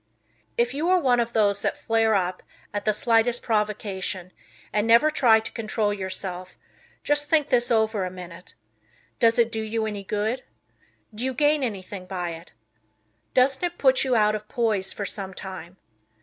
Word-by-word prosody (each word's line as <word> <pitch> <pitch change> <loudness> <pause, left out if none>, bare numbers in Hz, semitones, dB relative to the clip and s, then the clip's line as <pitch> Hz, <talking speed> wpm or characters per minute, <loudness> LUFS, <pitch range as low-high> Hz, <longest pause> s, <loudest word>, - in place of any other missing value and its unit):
If 240 +1 +1
you 310 +5 -1
are 370 - +5
one 250 -6 +3
of 235 0 0
those 205 -2 +2
that - - -1
flare 225 -1 +2
up 180 -1 -1 0.3
at 205 0 -3
the 215 - +4
slightest 230 +2 +2
"provocation" 205 -4 -2 0.4
and 210 +1 +1
never 235 +7 +5
try 235 -7 +5
to 220 - -6
control 215 -2 -1
yourself, 185 -2 -5 0.5
just 295 0 +1
think 305 -2 +3
this 240 -1 +2
over 220 -3 +2
a 185 - -2
minute. 180 -1 -11 0.6
Does 230 0 +4
it 235 -1 +3
do 220 - -2
you 220 0 -2
any 205 -2 -4
good? 215 +6 -2 0.7
Do 215 +3 -5
you 260 0 -1
gain 295 +2 +3
anything 195 -4 -5
by 180 -2 -3
it? 165 +1 -10 0.8
Doesn't 265 +4 +3
it 350 0 -2
put 265 -2 +4
you 260 -2 +1
out 210 -1 +3
of 210 0 -5
poise 215 -5 0
for 200 - -4
some 190 -2 -5
time? 185 -2 -8
220 Hz, 175 wpm, -25 LUFS, 195-240 Hz, 0.8 s, are